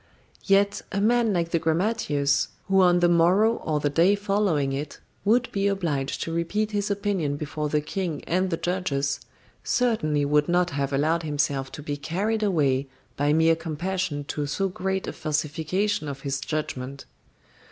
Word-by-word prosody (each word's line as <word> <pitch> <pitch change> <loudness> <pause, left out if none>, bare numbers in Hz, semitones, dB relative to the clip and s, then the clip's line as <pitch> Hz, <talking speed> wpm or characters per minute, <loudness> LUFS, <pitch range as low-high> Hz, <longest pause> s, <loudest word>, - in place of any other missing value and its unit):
Yet 200 +1 +3
a 195 - -1
man 230 +1 +3
like 170 -3 0
the 165 - +2
grammateus, 160 -4 +1 0.2
who 195 0 +4
on 175 -1 +4
the 175 - +5
morrow 180 +7 +4
or 155 -2 -1
the 145 -1 0
day 170 +7 +4
following 195 -9 0
it 145 +2 -5 0.2
would 235 +4 +3
be 200 0 0
obliged 160 -9 -1
to 165 - -4
repeat 205 +6 -1
his 205 -1 -1
opinion 195 -8 -1
before 150 0 -3
the 150 0 +1
King 170 0 -3
and 185 +2 0
the 165 - -1
judges, 145 -7 -1 0.4
certainly 155 -13 +1
would 150 +1 +2
not 175 0 +2
have 140 -1 -2
allowed 155 +4 +1
himself 145 -3 -1
to 150 - -7
be 145 -1 -3
carried 200 +9 -1
away 145 -9 +1 0.3
by 145 +1 +1
mere 160 +1 +4
compassion 165 -1 -3
to 145 +1 -3
so 195 +7 -1
great 190 +1 -2
a - - -4
falsification 155 +5 -1
of 135 -1 -6
his 140 0 -2
judgment. 140 -3 -4
165 Hz, 165 wpm, -25 LUFS, 145-195 Hz, 0.4 s, the